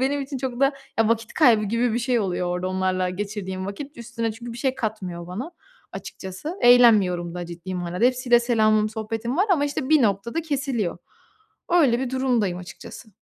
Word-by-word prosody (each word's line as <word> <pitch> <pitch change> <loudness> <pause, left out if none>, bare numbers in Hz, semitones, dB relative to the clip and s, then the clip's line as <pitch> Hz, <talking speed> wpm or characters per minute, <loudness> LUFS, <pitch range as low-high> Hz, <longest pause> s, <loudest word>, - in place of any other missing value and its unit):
benim 280 +2 +1
için 270 0 -5
çok 255 -1 -4
da 275 +1 +4 0.3
ya 225 - +4
vakit 230 -1 0
kaybı 235 -8 +4
gibi 230 +3 0
bir 235 - 0
şey 245 -1 +1
oluyor 180 -3 -1
orada 180 +1 -2
onlarla 185 -1 0
geçirdiğim 190 -1 -4
vakit. 280 +9 -7
Üstüne 230 -1 -3
çünkü 235 +2 -8
bir 235 - -8
şey 265 +1 0
katmıyor 185 -7 -4
bana 220 - -6 0.4
açıkçası. 190 - -7
Eğlenmiyorum 205 -8 +5
da 175 -1 -5
ciddi 175 +2 -7
manada. 180 +4 -2
Hepsiyle 250 -1 +4
selamım, 215 -3 +3
sohbetim 225 +4 -4
var 390 - +3
ama, 295 -5 +2
işte, 285 -2 -3
bir 310 -2 +5
noktada 230 - 0
kesiliyor. 265 - -2 0.7
Öyle 285 -9 +4
bir 260 -2 -2
durumdayım 245 -9 0
açıkçası. 180 +4 -11
230 Hz, 175 wpm, -24 LUFS, 190-255 Hz, 0.7 s, Eğlenmiyorum